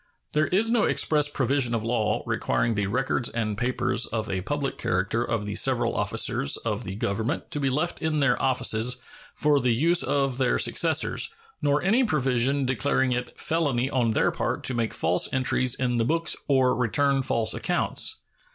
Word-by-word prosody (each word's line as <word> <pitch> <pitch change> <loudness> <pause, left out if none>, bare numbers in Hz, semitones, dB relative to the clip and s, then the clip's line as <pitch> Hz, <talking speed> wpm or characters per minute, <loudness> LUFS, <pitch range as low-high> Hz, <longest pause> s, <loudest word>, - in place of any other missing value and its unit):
There 155 +1 +2
is 215 +5 +2
no 235 -3 +3
express 150 -2 +1
provision 130 -3 0
of 110 - -2
law 115 -2 0
requiring 115 - 0
the 105 -2 -1
records 125 +2 -1
and 110 -3 -2
papers 125 +1 0
of 110 -2 -3
a 95 -1 -2
public 140 +6 -3
character 100 +6 0
of 115 -3 -2
the 105 - -4
several - - +1
officers 70 - +1
of - - -3
the 95 - -5
Government 110 +2 -3
to 145 - 0
be 135 -2 0
left 155 +6 -2
in 160 -1 0
their 135 -4 +2
offices 125 -1 +1 0.4
for 150 -1 +2
the 125 -3 +1
use 170 +7 +3
of 135 -2 0
their 125 -2 +2
successors, - - +1 0.3
nor 145 0 +1
any 220 +8 +3
provision 135 - +1
declaring 130 0 0
it 125 0 -4
felony 140 -6 0
on 120 -3 +1
their 110 - +1
part - - -3
to 130 - +1
make 115 -2 -1
false 90 - +1
entries 130 -1 +1
in 125 -2 -1
the 115 - +2
books 165 +6 0
or 130 -2 +3
return 135 +3 +1
false 115 -4 0
accounts. - - 0
130 Hz, 180 wpm, -25 LUFS, 115-145 Hz, 0.4 s, no